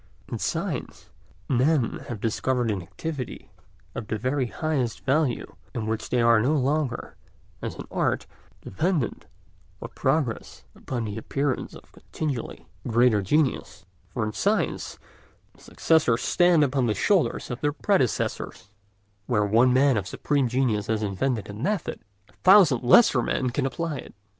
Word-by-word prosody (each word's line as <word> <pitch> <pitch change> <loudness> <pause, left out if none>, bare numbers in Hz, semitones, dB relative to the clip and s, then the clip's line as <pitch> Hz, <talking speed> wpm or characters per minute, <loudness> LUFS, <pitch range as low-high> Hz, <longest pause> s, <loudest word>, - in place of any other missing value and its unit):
In - - -5
science - - -4 0.4
men 130 0 +1
have 120 -4 -5
discovered 120 +2 0
an 100 -3 -2
activity 140 - -6 0.4
of 110 - -6
the 110 - -2
very 130 +3 -1
highest 135 -3 -2
value 135 -2 0 0.2
in 115 -3 -2
which 110 0 -3
they 125 - +1
are 115 -1 +5
no 140 +7 +2
longer, 140 -2 -1 0.5
as - - -4
in - - -8
art, - - 0 0.4
dependent 160 - -2 0.5
for - - -8
progress 140 -8 -2
upon 120 -3 -4
the 105 +1 -4
appearance 140 +3 -2
of - - -15
continually 140 -7 -5 0.2
greater 120 -2 +3
genius, 115 -3 0 0.2
for 110 +3 -2
in 105 - -4
science 205 - -1 0.6
the - - -23
successors 155 -8 +1
stand 175 -3 +4
upon 135 -3 +1
the 105 - 0
shoulders 195 -9 +1
of 120 - -5
their 145 - +1
predecessors; 145 - -1 0.6
where 105 -4 +2
one 115 +5 +4
man 130 -1 +4
of 100 -2 -2
supreme 140 +6 0
genius 115 -4 0
has 110 -1 0
invented 105 +3 -1
a 100 - -8
method, 165 - -2 0.3
a - - -25
thousand 185 - +6
lesser 130 - +6
men 125 +1 -1
can 135 +2 0
apply 165 +1 -3
it. - - -10
125 Hz, 150 wpm, -25 LUFS, 115-150 Hz, 0.6 s, thousand